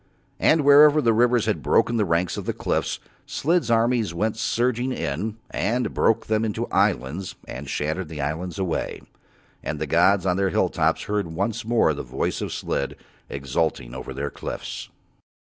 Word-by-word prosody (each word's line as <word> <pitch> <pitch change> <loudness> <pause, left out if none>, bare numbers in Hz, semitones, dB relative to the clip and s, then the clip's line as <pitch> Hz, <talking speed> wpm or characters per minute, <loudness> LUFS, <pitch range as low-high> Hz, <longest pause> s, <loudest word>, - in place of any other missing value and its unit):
And 160 - +4
wherever 145 +1 +7
the 115 -6 +3
rivers 120 0 +3
had - - 0
broken 115 - +2
the 105 - +2
ranks 85 0 0
of - - -5
the - - -1
cliffs, - - -1 0.3
Slid's 170 -1 0
armies 115 -5 +2
went 110 +5 0
surging 120 +2 0
in 105 - -3
and 120 +6 -1
broke 115 0 +2
them 110 0 +1
up - - 0
into 105 - -2
islands 85 +8 0
and 65 +2 -7
shattered 80 +6 -2
the 80 -3 -7
islands 80 +6 -3
away. 95 -4 -2 0.6
And 75 - -3
the 80 - -2
gods 90 +5 +3
on 90 -1 +2
Their 95 0 +2
hill - - +2
tops - - +1
heard 105 -3 -1
once 100 +7 -2
more 115 -9 +3
the 70 - -5
voice 65 +1 -3
of - - -3
Slid 70 - -2 0.3
exulting 70 -2 -2
over 65 - -7
Their 70 +2 -4
cliffs. - - -6
100 Hz, 175 wpm, -24 LUFS, 80-115 Hz, 0.6 s, wherever